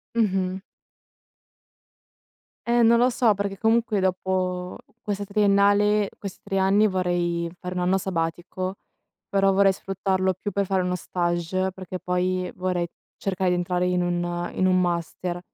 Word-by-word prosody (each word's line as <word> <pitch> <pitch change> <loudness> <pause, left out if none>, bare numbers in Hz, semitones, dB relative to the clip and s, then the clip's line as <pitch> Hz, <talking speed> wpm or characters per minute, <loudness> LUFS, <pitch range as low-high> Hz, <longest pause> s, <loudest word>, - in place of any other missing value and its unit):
Mh-mh. 190 -4 0 2.1
Eh, 240 0 +3
non 235 0 +6
lo 245 +2 +4
so, 230 -4 +3
perché, 200 -1 -3
comunque, 225 -1 +2
dopo 185 -1 -1 0.2
questa 205 -1 -2
triennale 205 0 +3
questi 200 -2 -7
3 195 - -3
anni, 195 +3 +4
vorrei 175 -2 0
fare 180 0 -6
1 180 - -1
anno 185 +2 +2
sabbatico, 185 +1 -3 0.5
però 195 -2 +3
vorrei 195 0 +5
sfruttarlo 190 0 -1
più 190 +3 -5
per 200 +1 0
fare 190 0 +1
uno 180 0 -1
stage, 175 +1 -1
perché 185 -1 -7
poi 180 0 -1
vorrei 180 -1 -1 0.3
cercare 190 -2 0
di - - +2
entrare 180 0 0
in 180 0 +1
un 175 0 -2
in 185 - +1
un 185 0 +4
master. 175 0 -2
185 Hz, 145 wpm, -24 LUFS, 180-200 Hz, 2.1 s, non